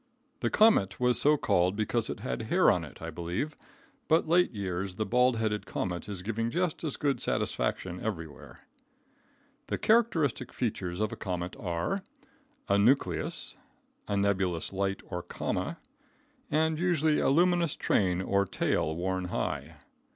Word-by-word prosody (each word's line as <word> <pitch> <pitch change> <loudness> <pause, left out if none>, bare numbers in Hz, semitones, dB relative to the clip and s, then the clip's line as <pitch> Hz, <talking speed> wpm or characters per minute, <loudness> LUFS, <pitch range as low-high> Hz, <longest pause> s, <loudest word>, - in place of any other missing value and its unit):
The - - 0
comet 155 - +4
was 125 0 +2
so 150 +1 +5
called 90 -6 +2
because 110 +2 0
it - - -5
had - - -3
hair - - +5
on - - 0
it, - - -11
I 80 - -4
believe, 90 - -3 0.5
but 160 0 +3
late 180 +2 +4
years 95 -3 -3
the 110 - -1
bald 125 +1 +3
headed 110 -1 -1
comet 90 +2 -3
is 95 -3 -6
giving 115 +2 -1
just 175 +5 -1
as 155 -4 -3
good 140 -2 0
satisfaction 90 -1 -1
everywhere. 80 -8 -6 1.1
The - - -1
characteristic 180 - +2
features 95 -6 -2
of 110 - 0
a - - -4
comet 90 -1 -4
are: 90 - -2 0.7
A 100 0 +3
nucleus, 125 +7 +1 0.5
a 100 - 0
nebulous 95 -4 0
light 100 0 -1
or 90 -2 -4
coma, - - -3 0.7
and 160 +1 +1
usually 160 -4 +2
a - - +2
luminous 175 +2 +3
train 90 -2 +1
or 100 +1 +2
tail 80 -2 0
worn 95 +1 -1
high. 90 - -3
105 Hz, 150 wpm, -29 LUFS, 90-150 Hz, 1.1 s, so